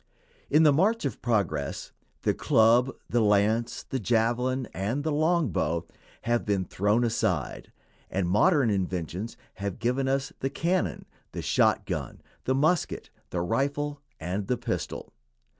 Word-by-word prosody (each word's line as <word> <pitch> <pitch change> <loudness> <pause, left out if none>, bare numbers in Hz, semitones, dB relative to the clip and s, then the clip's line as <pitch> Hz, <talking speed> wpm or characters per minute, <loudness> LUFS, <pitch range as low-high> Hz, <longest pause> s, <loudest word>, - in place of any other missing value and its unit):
In 155 - +5
the 150 -2 +6
march 200 +6 +2
of 135 - -3
progress 95 - -1 0.3
the - - +2
club, 115 +3 +4 0.2
the 120 - +1
lance, 110 +3 +2
the 130 - -3
javelin, 120 +3 +1
and 110 +9 -2
the 160 - 0
long 155 0 +2
bow 85 -1 -1 0.4
have 120 0 +1
been 100 -3 0
thrown 105 +7 +1
aside, 115 -1 -1 0.4
and 95 -2 -1
modern 135 - +4
invention 95 0 -2 0.3
has 100 0 -4
given 125 +3 0
us 135 +1 -1
the 135 - -1
cannon, 170 +6 -1 0.3
the - - -4
shotgun, - - +1 0.3
the 130 - +1
musket, 155 +5 0 0.2
the 85 - -2
rifle, 140 +9 -1 0.2
and 95 +4 -3
the 125 - +1
pistol. 120 -1 -4
120 Hz, 140 wpm, -27 LUFS, 100-140 Hz, 0.4 s, the